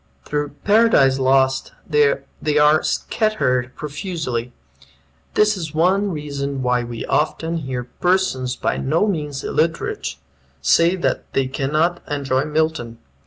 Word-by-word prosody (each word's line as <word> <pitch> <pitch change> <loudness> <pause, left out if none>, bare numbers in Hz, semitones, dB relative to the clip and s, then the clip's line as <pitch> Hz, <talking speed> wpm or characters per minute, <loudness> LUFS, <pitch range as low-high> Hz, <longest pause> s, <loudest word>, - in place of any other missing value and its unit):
Through 145 -1 -3
"Paradise 205 -12 +4
Lost" 130 0 +2
they 150 0 +1
are 150 +1 +5
scattered 130 - 0
profusely. 145 -6 -4 0.8
This 210 0 +4
is 160 -5 -6
one 190 +5 +2
reason 140 -4 -4
why 125 -1 +1
we 120 -1 -6
often 160 +2 0
hear 130 -5 -4
persons 130 -3 0
by - - -1
no 155 +9 +1
means 150 -8 -3
illiterate 155 - -1 0.4
say 165 - +4
that 180 - -2
they 135 - +2
cannot 155 +6 0
enjoy 140 -2 0
Milton. 155 -6 -1
150 Hz, 120 wpm, -20 LUFS, 130-165 Hz, 0.8 s, are